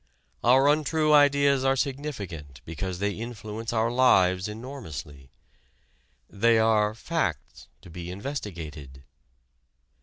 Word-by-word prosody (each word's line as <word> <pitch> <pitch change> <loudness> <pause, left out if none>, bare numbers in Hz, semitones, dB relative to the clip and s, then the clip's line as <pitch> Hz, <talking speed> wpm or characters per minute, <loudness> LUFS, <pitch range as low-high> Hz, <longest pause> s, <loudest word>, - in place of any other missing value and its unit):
Our 130 +3 +5
untrue 155 +1 +2
ideas 140 -2 +4
are 135 0 +3
significant 105 - -5
because 90 +3 -5
they 100 +2 -1
influence 110 0 -6
our 115 0 +1
lives 95 -7 +3
enormously. 105 - -8 1.0
They 115 +3 +2
are 110 -1 +2
"facts" 115 - -3 0.2
to - - -13
be 85 +1 -7
investigated. 85 - -7
110 Hz, 100 wpm, -26 LUFS, 90-135 Hz, 1.0 s, Our